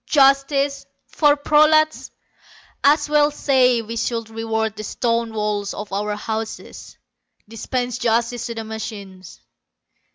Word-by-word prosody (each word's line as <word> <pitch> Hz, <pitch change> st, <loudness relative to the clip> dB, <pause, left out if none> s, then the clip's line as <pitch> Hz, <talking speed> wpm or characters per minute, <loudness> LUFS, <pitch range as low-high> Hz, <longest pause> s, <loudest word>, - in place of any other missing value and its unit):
Justice! 275 Hz, 0 st, +2 dB, 0.2 s
For 295 Hz, -2 st, +3 dB
prolats! 305 Hz, +1 st, +3 dB, 0.7 s
As 290 Hz, +3 st, +4 dB
well 295 Hz, 0 st, +3 dB
say 255 Hz, -5 st, +2 dB
we 225 Hz, +1 st, -7 dB
should 230 Hz, -1 st, -3 dB
reward 220 Hz, -1 st, -2 dB
the 215 Hz, -, -7 dB
stone 230 Hz, +1 st, -1 dB
walls 210 Hz, -2 st, -2 dB
of 210 Hz, -1 st, -7 dB
our 210 Hz, +1 st, -2 dB
houses; 220 Hz, +1 st, -6 dB, 0.5 s
dispense 245 Hz, +3 st, -3 dB
justice 235 Hz, 0 st, 0 dB
to 235 Hz, -, -6 dB
the 225 Hz, -, -5 dB
machines. 210 Hz, -5 st, -8 dB
230 Hz, 120 wpm, -21 LUFS, 220-275 Hz, 0.7 s, As